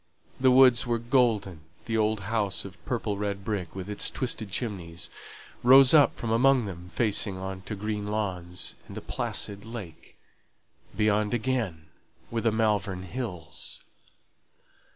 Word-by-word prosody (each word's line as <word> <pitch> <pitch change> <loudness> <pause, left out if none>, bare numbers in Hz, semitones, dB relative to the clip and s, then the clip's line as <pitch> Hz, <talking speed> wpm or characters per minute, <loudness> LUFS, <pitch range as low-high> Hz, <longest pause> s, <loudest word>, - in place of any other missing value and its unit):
The 130 0 +5
woods 125 -1 +6
were 120 -1 +1
golden; 115 - +1 0.2
the 115 - -2
old 110 -1 +1
house 100 -1 -1
of 90 -2 -11
purple 115 -5 -1
red 100 -1 -3
brick, 100 -5 -3
with 95 -1 -5
its 105 0 -1
twisted 115 -5 -3
chimneys, 90 -6 -4 0.5
rose 130 +2 +8
up 150 -3 +6
from 115 - -4
among 130 +1 +4
them 90 -2 -8
facing 105 -2 0
on 95 0 -5
to 105 - -2
green 105 0 -3
lawns, 90 -5 -2
and - - -9
a - - -2
placid 100 0 -3
lake; 110 -8 -9 0.8
beyond 105 +1 +2
again 110 -10 -2 0.5
were 115 -1 -1
the 115 - +2
Malvern 105 -4 0
Hills. 90 -7 -5
105 Hz, 140 wpm, -27 LUFS, 95-115 Hz, 0.8 s, rose